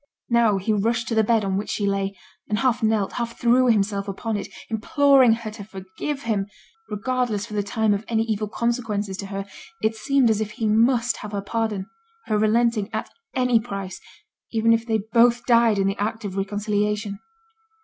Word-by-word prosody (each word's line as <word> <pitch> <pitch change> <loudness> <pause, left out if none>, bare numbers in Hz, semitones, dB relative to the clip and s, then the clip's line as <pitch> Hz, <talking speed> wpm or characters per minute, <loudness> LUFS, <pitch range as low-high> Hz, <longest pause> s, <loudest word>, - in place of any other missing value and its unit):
Now 230 -4 +4
he 195 +3 0
rushed 230 +3 0
to - - -1
the 220 -1 +4
bed 220 -1 +2
on 190 0 0
which 205 - -4
she 205 - -1
lay, 195 0 -1 0.3
and 210 - +1
half 250 +1 +1
knelt, 220 -3 +1
half 235 -1 -4
threw 245 +2 +4
himself 200 -3 +1
upon 215 +3 -3
it, 205 - -3 0.2
imploring 265 +2 +4
her 225 -1 -4
to 215 -1 -9
forgive 195 +9 -6
him; 205 -5 -1 0.4
regardless 225 -1 -1
for 225 - -10
the 210 - +1
time 215 +1 +1
of 205 +1 -2
any 225 -1 +1
evil 215 -2 -2
consequences 220 -3 -2
to 200 - -6
her, 195 0 -4 0.4
it 220 +1 +1
seemed 265 0 +2
as 215 0 0
if 215 -1 -3
he 230 - -3
must 230 +2 +3
have 210 0 -8
her 200 - -1
pardon 215 -3 -2 0.4
her 215 -1 0
relenting 220 -1 +2
at - - -4 0.2
any 250 -3 +3
price, 195 -4 -6 0.5
even 225 0 +3
if 230 +1 0
they 220 -2 +1
both 235 0 +4
died 235 -3 +4
in 195 - +2
the 195 0 -1
act 220 +1 -2
of 190 -2 -5
reconciliation. 205 +1 -1
220 Hz, 190 wpm, -23 LUFS, 205-235 Hz, 0.5 s, Now